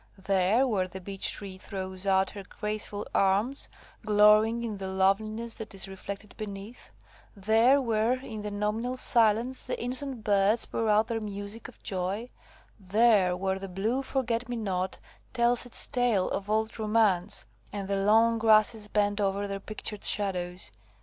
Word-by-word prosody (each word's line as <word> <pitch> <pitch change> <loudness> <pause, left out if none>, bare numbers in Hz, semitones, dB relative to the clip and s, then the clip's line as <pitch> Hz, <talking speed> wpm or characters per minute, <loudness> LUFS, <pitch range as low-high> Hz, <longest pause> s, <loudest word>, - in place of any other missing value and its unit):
There, 195 +5 +2
where 200 -7 0
the 185 +1 -8
beech 195 +1 -2
tree 190 -2 -7
throws 190 -1 -6
out 190 0 +3
her 200 - -8
graceful 210 +1 -4
arms, 205 +8 +1 0.3
glorying 215 +2 +5
in 220 -3 -4
the 190 -1 -5
loveliness 215 +4 0
that 215 -2 -8
is 195 - -3
reflected 200 +2 -8
beneath. 205 +2 -8 0.4
There, 225 +7 +4
where 230 -2 +1
in 220 -5 -7
the 210 - -4
nominal 210 +5 -2
silence 235 +1 +2
the - - -3
innocent 250 0 -4
birds 205 +2 +3
pour 225 -1 -2
out 210 +1 +4
their 225 -1 -3
music 205 +1 -6
of 245 - -16
joy. 195 +5 -2 0.5
There, 200 -2 +3
where 190 0 -1
the 195 0 -7
blue 215 +8 -1
forget 250 -3 -2
me 245 - -2
not 190 -4 -2 0.4
tells 240 0 +2
its 245 - 0
tale 240 -7 +1
of 200 +1 -3
old 220 +1 0
romance, 210 -3 +1 0.3
and 200 -1 -5
the 200 0 0
long 225 +2 +4
grasses 215 -1 +3
bend 205 0 +1
over 200 0 0
their 195 0 -4
pictured 210 0 -6
shadows. 180 -3 -1
210 Hz, 155 wpm, -28 LUFS, 195-230 Hz, 0.5 s, glorying